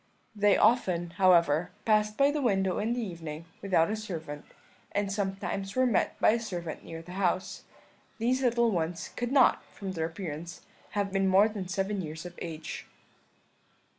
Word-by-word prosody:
They 205 Hz, -1 st, +4 dB
often, 185 Hz, -7 st, +2 dB
however, 170 Hz, -4 st, +4 dB, 0.2 s
passed 215 Hz, -1 st, +2 dB
by 280 Hz, +1 st, +5 dB
the 300 Hz, 0 st, -1 dB
window 195 Hz, -6 st, +1 dB
in 220 Hz, +3 st, 0 dB
the 240 Hz, -1 st, -2 dB
evening 165 Hz, -3 st, -7 dB, 0.2 s
without 185 Hz, -2 st, +2 dB
a -, -, 0 dB
servant, 160 Hz, -9 st, -6 dB, 0.5 s
and 200 Hz, -1 st, 0 dB
sometimes 195 Hz, 0 st, -3 dB
were 255 Hz, 0 st, +4 dB
met 240 Hz, -5 st, +1 dB
by -, -, +5 dB
a 230 Hz, -, +1 dB
servant 175 Hz, -7 st, -5 dB
near 165 Hz, 0 st, -8 dB
the 175 Hz, -, -11 dB
house. 185 Hz, 0 st, -1 dB, 0.5 s
These 250 Hz, +3 st, +1 dB
little 235 Hz, -2 st, +3 dB
ones 170 Hz, -2 st, -2 dB
could 245 Hz, 0 st, -2 dB
not, 270 Hz, -3 st, +5 dB
from 195 Hz, -2 st, -7 dB
their 160 Hz, -3 st, -1 dB
appearance, 165 Hz, -1 st, -7 dB, 0.4 s
have 200 Hz, -1 st, 0 dB
been 195 Hz, 0 st, +2 dB
more 195 Hz, +3 st, +6 dB
than 205 Hz, -4 st, -5 dB
seven 195 Hz, +1 st, -1 dB
years 155 Hz, 0 st, -7 dB
of 175 Hz, -, -7 dB
age. 160 Hz, -2 st, -6 dB
195 Hz, 165 wpm, -29 LUFS, 170-215 Hz, 0.5 s, more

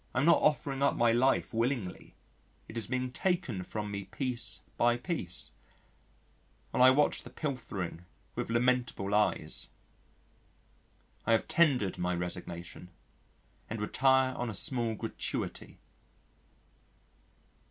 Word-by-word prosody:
I -, -, +2 dB
am 135 Hz, -, +2 dB
not 170 Hz, -, +5 dB
offering 140 Hz, -3 st, +1 dB
up 140 Hz, -, +3 dB
my 120 Hz, -1 st, +3 dB
life 125 Hz, +3 st, +2 dB
willingly 115 Hz, -5 st, -2 dB, 0.5 s
it -, -, -11 dB
is 115 Hz, -4 st, -2 dB
being 130 Hz, 0 st, -2 dB
taken 170 Hz, -, -1 dB
from 105 Hz, +1 st, -5 dB
me 100 Hz, -1 st, -5 dB
piece 125 Hz, +2 st, -1 dB
by 120 Hz, 0 st, +3 dB
piece, 120 Hz, -, -2 dB, 1.2 s
while -, -, 0 dB
I 130 Hz, -, +9 dB
watch 145 Hz, +3 st, +3 dB
the -, -, -11 dB
pilfering 115 Hz, -, -5 dB, 0.3 s
with -, -, -4 dB
lamentable 120 Hz, -4 st, 0 dB
eyes. 105 Hz, 0 st, +4 dB, 1.6 s
I 115 Hz, -, +4 dB
have 110 Hz, -, +1 dB
tendered 135 Hz, -, +2 dB
my 90 Hz, 0 st, 0 dB
resignation 90 Hz, 0 st, -5 dB, 0.8 s
and 110 Hz, -, -4 dB
retire 130 Hz, +4 st, +2 dB
on 120 Hz, -1 st, -3 dB
a 110 Hz, -, -4 dB
small 120 Hz, -, +1 dB
gratuity. -, -, -4 dB
120 Hz, 120 wpm, -31 LUFS, 105-130 Hz, 1.6 s, I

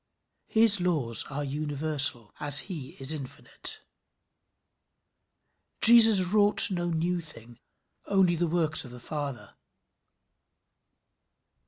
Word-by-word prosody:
His 220 Hz, -3 st, +3 dB
laws 150 Hz, -11 st, -2 dB
are 145 Hz, +1 st, -7 dB
universal 145 Hz, -4 st, -2 dB
as 145 Hz, -1 st, +6 dB
he 155 Hz, -9 st, -8 dB
is 135 Hz, +2 st, -2 dB
infinite. 140 Hz, -5 st, -7 dB, 2.0 s
Jesus 225 Hz, -4 st, +6 dB
wrought 205 Hz, +3 st, +4 dB
no 175 Hz, -1 st, -4 dB
new 170 Hz, +2 st, -3 dB
thing 120 Hz, -7 st, -9 dB, 0.5 s
only 190 Hz, -3 st, +1 dB
the 170 Hz, +1 st, -2 dB
works 160 Hz, -1 st, -1 dB
of 130 Hz, -, -12 dB
the 125 Hz, 0 st, -13 dB
Father. 140 Hz, -1 st, -8 dB
155 Hz, 100 wpm, -25 LUFS, 140-180 Hz, 2.0 s, as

